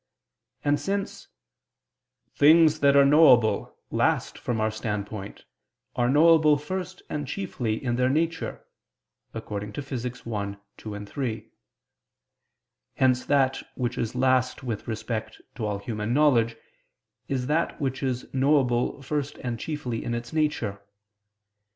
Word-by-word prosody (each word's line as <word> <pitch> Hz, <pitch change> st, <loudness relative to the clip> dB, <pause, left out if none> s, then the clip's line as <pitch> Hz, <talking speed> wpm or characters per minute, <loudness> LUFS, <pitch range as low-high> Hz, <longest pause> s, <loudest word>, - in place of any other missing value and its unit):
And, 145 Hz, 0 st, +2 dB
since 195 Hz, +6 st, -3 dB, 1.1 s
"things 155 Hz, +1 st, +6 dB
that 140 Hz, 0 st, +4 dB
are 140 Hz, 0 st, +7 dB
knowable 140 Hz, -6 st, +5 dB
last -, -, +1 dB
from 120 Hz, -2 st, -3 dB
our 110 Hz, 0 st, +1 dB
standpoint, 105 Hz, -2 st, -5 dB, 0.5 s
are 120 Hz, 0 st, +1 dB
knowable 155 Hz, +1 st, +5 dB
first 180 Hz, +4 st, -5 dB
and 145 Hz, -2 st, -4 dB
chiefly 125 Hz, -, -2 dB
in 120 Hz, 0 st, -2 dB
their 125 Hz, 0 st, +2 dB
nature" 165 Hz, +4 st, -1 dB, 0.7 s
(Phys. 115 Hz, +5 st, -5 dB
i, 125 Hz, -, -1 dB
text. 125 Hz, -, -14 dB, 0.5 s
2, 105 Hz, -1 st, -7 dB
3); 115 Hz, -1 st, -4 dB, 1.5 s
hence 125 Hz, -1 st, +2 dB
that 135 Hz, -2 st, +2 dB
which 120 Hz, -1 st, -2 dB
is 115 Hz, +1 st, -2 dB
last 130 Hz, 0 st, +1 dB
with 115 Hz, -5 st, -4 dB
respect 110 Hz, -1 st, -4 dB
to 110 Hz, -4 st, -3 dB
all 105 Hz, -1 st, -2 dB
human 105 Hz, +2 st, -3 dB
knowledge, 120 Hz, -6 st, +3 dB, 0.7 s
is 130 Hz, -2 st, -1 dB
that 155 Hz, +5 st, 0 dB
which 130 Hz, -3 st, -2 dB
is 130 Hz, -2 st, -2 dB
knowable 135 Hz, -1 st, +2 dB
first 145 Hz, +1 st, -3 dB
and 120 Hz, -2 st, -3 dB
chiefly 130 Hz, -7 st, -4 dB
in 120 Hz, -, -2 dB
its 120 Hz, +3 st, -6 dB
nature. 120 Hz, -11 st, -1 dB
130 Hz, 125 wpm, -26 LUFS, 115-145 Hz, 1.5 s, are